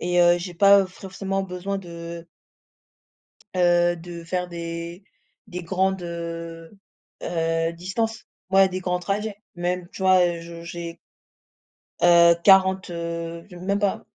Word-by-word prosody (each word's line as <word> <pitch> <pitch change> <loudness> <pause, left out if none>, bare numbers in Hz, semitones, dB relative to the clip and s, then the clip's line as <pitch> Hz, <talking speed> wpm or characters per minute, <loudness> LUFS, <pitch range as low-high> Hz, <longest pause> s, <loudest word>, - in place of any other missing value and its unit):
et, 175 0 +2
heu, 175 0 +6
j'ai 175 +1 -6
pas 200 +2 +6
forcément 195 +1 -4
besoin 190 +1 -4
de 170 -2 -8 1.3
heu, 175 -1 +4
de 170 0 -9
faire 180 +1 -2
des 170 +1 -6 0.4
des 180 -3 -6
grandes, 190 +2 0
heu, 170 -1 -6 0.5
heu, 165 -1 0
distances. 205 +6 -3 0.2
Ouais 195 0 +6
des 185 0 -4
grands 180 -1 -1
trajets. 205 +3 -2 0.2
Même, 175 0 -2
tu - - -7
vois 180 -2 +4
je 170 0 -9
j'ai 170 0 -7 1.0
heu, 170 -1 +7
40, 190 -1 +5
heu, 170 0 -5
j 180 - -12
même 195 +3 -1
pas 205 -1 -1
175 Hz, 130 wpm, -24 LUFS, 170-190 Hz, 1.3 s, heu